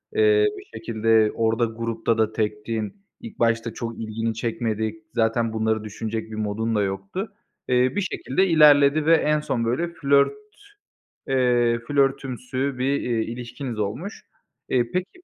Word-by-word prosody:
Eee, 430 -1 +4
bir 390 - -9
şekilde 110 -4 +2
orada 115 +1 +1
grupta 115 0 -2
da 110 -1 +1
tektin, 110 - -3 0.2
ilk 230 -3 -10
başta 115 -1 +1
çok 115 0 -6
ilgini 115 +1 -2
çekmedi. 110 -1 -2 0.2
Zaten 115 0 +1
bunları 110 -1 0
düşünecek 110 +1 -5
bir - - -5
modun 110 +1 -2
da 105 - +2
yoktu. 100 - -4 0.3
Eee, 125 - +2 0.2
bir 205 - +1
şekilde 185 -1 0
ilerledi 150 -2 +6
ve 165 +1 +6
en 150 -1 +2
son 135 -6 -2
böyle 125 +9 0
flört, 140 -4 +3 1.0
eee, 120 -3 +2
flörtümsü 135 -1 -1
bir, 135 +2 +1
eee, 115 -2 0
ilişkiniz 120 +1 -6
olmuş. 120 - -4 0.4
E, 120 -2 +1
peki, 185 +1 -2
115 Hz, 140 wpm, -24 LUFS, 110-140 Hz, 1.0 s, ilerledi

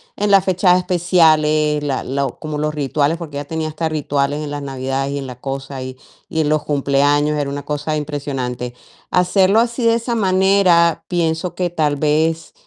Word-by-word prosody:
en 210 0 -1
las 195 -1 +5
fechas 185 -1 +3
especiales, 155 -4 +2
la 140 -3 -2
lo 135 -1 -2
como 155 -1 -5
los 150 0 -2
rituales, 145 +2 0
porque 155 -4 -7
ella 145 - -5
tenía 160 0 -3
hasta 160 +1 -3
rituales 145 -1 -1
en 145 - -5
las 145 0 -4
navidades 135 0 -3
y - - -2
en 140 - -5
la 125 -1 -9
cosa 135 0 -5
y 130 0 -8 0.3
y 160 - 0
en 150 - 0
los 155 -1 +1
cumpleaños. 145 +1 +2
Era 140 -1 -1
una 145 0 -5
cosa 150 +1 -2
impresionante. 135 -5 -4 0.4
Hacerlo 190 +3 +3
así 235 +1 0
de 230 0 +4
esa 235 +1 -2
manera 185 -4 +3
pienso 170 0 -1
que 180 -1 -1
tal 150 -4 0
vez, 160 +2 0
150 Hz, 185 wpm, -18 LUFS, 140-175 Hz, 0.4 s, las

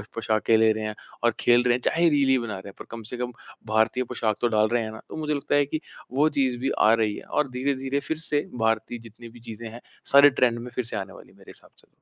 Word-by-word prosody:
पोशाक 110 -1 -1
ले 110 0 +5
रहे 110 0 -3
हैं 105 0 -4 0.3
और 120 -1 +3
खेल 120 0 +4
रहे 125 -1 +3
हैं, 125 - -4
चाहे 170 +4 +3
रील 135 -3 +3
बना 115 -3 -4
रहे 95 - -10
हैं - - -13
पर - - -8
कम 115 -1 -7
से 125 - -4
कम 125 0 -3 0.4
भारतीय 110 +3 +2
पोशाक 115 -3 -1
तो 120 - +3
डाल 110 -1 +3
रहे 120 0 0
हैं 110 - -5
ना? 110 - -10
तो - - -8
मुझे 150 -1 -1
लगता 140 0 -1
है 145 - +4
कि 155 +3 -4 0.3
वो 145 +4 +3
चीज़ 130 -4 0
भी 135 +2 -1
आ 110 +1 +6
रही 110 -2 +1
है - - -9
और 150 -2 0
धीरे-धीरे 135 +2 -1
फिर 160 +2 -3
से 150 -2 -1 0.2
भारतीय 110 +1 0
जितनी 115 +1 -13
भी 120 - -15
चीज़ें 115 0 -8
हैं 120 +2 -11 0.3
सारे 140 +1 +9
ट्रेंड 120 -2 +3
में 125 +1 -7
फिर 125 - -1
से 110 - -4
आने 95 -1 -6
वाली - - -14
हैं, - - -23
मेरे - - -14
हिसाब - - -19
से। - - -27
120 Hz, 275 wpm, -25 LUFS, 110-135 Hz, 0.4 s, सारे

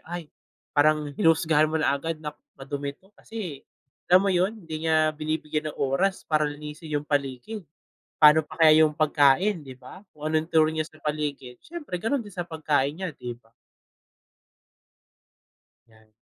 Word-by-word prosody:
ay, 170 -3 -7 0.4
parang 150 0 +2
hinusgahan 155 0 +3
mo 160 - -1
na 155 -3 +2
agad 160 +3 -2
na 150 - -3 0.2
madumi 140 +1 -5
'to 190 +2 -27
kasi, 200 -12 -7 0.5
alam 185 +2 +6
mo 195 - +2
'yon, 185 +5 +1
hindi 160 0 -4
niya 155 -1 +3
binibigyan 155 0 -3
ng 150 - -9
oras 145 +8 0
para 155 -1 +1
linisin 150 +2 -8
'yong 150 -1 -2
paligid. 140 - -2 0.6
Paano 155 +1 +7
pa 150 - -13
kaya 155 -1 +7
'yong 155 - +3
pagkain, 155 +4 +3
'di 130 -2 -11
ba, 160 +10 -13
kung 150 0 -6
anong 160 +1 0
turing 155 0 +3
niya - - -11
sa 155 - -19
paligid, 145 -5 -3
siyempre 320 - -7
gano'n 225 +9 0
din 205 -4 -10
sa 175 - -2
pagkain 150 -4 0
niya, 180 -1 -6
'di 120 -1 -7
ba? 115 -1 -30 2.3
Yan, 110 -1 -23
155 Hz, 165 wpm, -26 LUFS, 145-165 Hz, 2.3 s, Paano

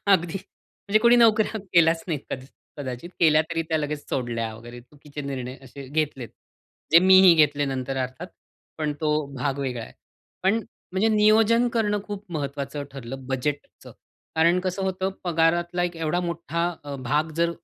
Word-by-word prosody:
अगदी, 170 -2 +2
म्हणजे 200 +2 -3
कोणी 240 +1 +6
नोकऱ्या 220 -2 +4
केल्याच 165 -1 +4
नाही 155 -4 -1
कद 130 - -4 0.3
कदाचित. 130 +4 -6
केल्या 155 -1 +5
तरी 165 -1 -1
त्या 160 -1 +1
लगेच 150 0 -4
सोडल्या 115 -3 -2
वगैरे 120 +2 -11
चुकीचे 145 +3 -11
निर्णय 130 -2 -5
असे 135 +2 -10
घेतलेत. 145 -5 -2 0.6
जे 165 - +10
मीही 185 -1 +7
घेतले 145 -2 +3
नंतर 135 -1 -3
अर्थात 130 +8 -6 0.5
पण 150 -1 -1
तो 155 -1 +1 0.2
भाग 135 +1 -2
वेगळा 125 -4 -3
आहे. - - -14 0.5
पण 195 +4 +3 0.4
म्हणजे 195 +4 +2
नियोजन 220 +2 +4
करणं 210 -3 0
खूप 205 -1 -7
महत्त्वाचं 140 -1 -4
ठरलं 135 0 -8
बजेटचं. 140 +2 -4 0.4
कारण 170 +3 +4
कसं 185 +1 -3
होतं 190 0 -1
पगारातला 175 +1 +1
एक 175 -1 -2
एवढा 165 +2 -1
मोठा 170 0 -2 0.2
अ, 145 - -6
भाग 150 +5 -1
जर 170 0 +2
160 Hz, 155 wpm, -24 LUFS, 140-180 Hz, 0.6 s, जे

